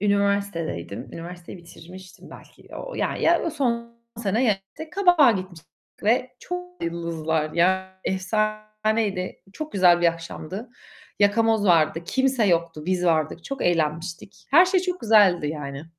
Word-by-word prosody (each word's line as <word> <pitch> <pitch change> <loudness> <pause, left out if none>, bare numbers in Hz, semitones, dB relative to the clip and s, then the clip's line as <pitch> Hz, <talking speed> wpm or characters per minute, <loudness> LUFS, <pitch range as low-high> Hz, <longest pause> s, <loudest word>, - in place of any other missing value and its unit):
Üniversitedeydim, 200 - -1
üniversiteyi 175 +2 -9
bitirmiştim 180 +2 -13
belki - - -15
o - - -7
ya, - - -1
ya, 340 +1 +3
o - - -6
yıl 335 - -1
son 235 -5 -2 0.2
sene 225 +2 0
ya 215 -5 +3 0.4
Kabak'a 355 -8 +5
gitmiştik 185 -5 -5 0.3
ve 250 +4 +1
çok 360 0 -7
yıldızlar. 160 -2 -2
Ya, 190 +2 +1
efsaneydi 215 0 -1 0.2
çok 310 +6 -7
güzel 180 -3 +5
bir 175 - +4
akşamdı. 165 +6 -4 0.5
Yakamoz 215 +1 +3
vardı, 165 -2 +3
kimse 265 -3 +1
yoktu, 170 -3 0
biz 185 -1 0
vardık. 160 0 0
Çok 275 -1 -5
eğlenmiştik. 165 +2 -2
Her 335 +6 +8
şey 370 0 +2
çok 360 0 -3
güzeldi 205 -8 +4
yani. 145 -1 -6
190 Hz, 135 wpm, -24 LUFS, 170-230 Hz, 0.5 s, Her